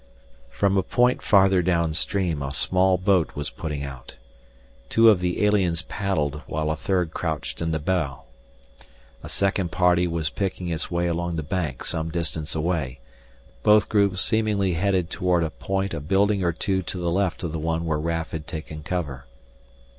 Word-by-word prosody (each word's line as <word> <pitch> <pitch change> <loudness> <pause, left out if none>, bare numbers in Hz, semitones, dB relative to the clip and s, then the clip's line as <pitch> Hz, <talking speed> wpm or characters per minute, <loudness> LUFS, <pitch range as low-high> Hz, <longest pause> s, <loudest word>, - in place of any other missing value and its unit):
From 100 +8 +1
a - - +4
point 125 +5 +2
farther 95 -2 +4
downstream 85 0 0
a 70 0 -3
small 95 0 +3
boat 95 -2 +2
was 75 0 -3
putting 75 -3 -4
out. 65 -3 -9 0.7
Two 115 0 +7
of 100 - +2
the 90 +3 0
aliens 90 -5 +2
paddled 75 -9 -2
while 75 0 -1
a - - 0
third 90 -2 -1
crouched 80 -2 -3
in 85 - 0
the 80 - 0
bow. 75 -4 -1 1.0
A - - -9
second 95 -3 0
party 90 -1 +3
was 80 -4 -2
picking 95 -1 -3
its 80 -2 -2
way 85 0 0
along 85 0 -1
the 80 - -2
bank 75 -4 -3
some 80 0 -2
distance 80 -2 -3
away, 75 -6 -1 0.6
both 105 0 +5
groups 100 -3 +2
seemingly 105 -4 +1
heading 95 +1 +1
toward 90 0 0
a 80 - -2
point 95 0 -2
a - - -2
building 100 +6 +2
or 85 - +2
two 95 +3 -1
to 95 - -5
the 85 -1 -1
left 95 0 0
of 85 - -2
the 80 - -3
one 80 +1 -1
where 80 -2 0
Raf 80 +1 -2
had 80 -2 -6
taken 80 -2 -6
cover. 75 -6 -4
85 Hz, 175 wpm, -24 LUFS, 80-95 Hz, 1.0 s, Two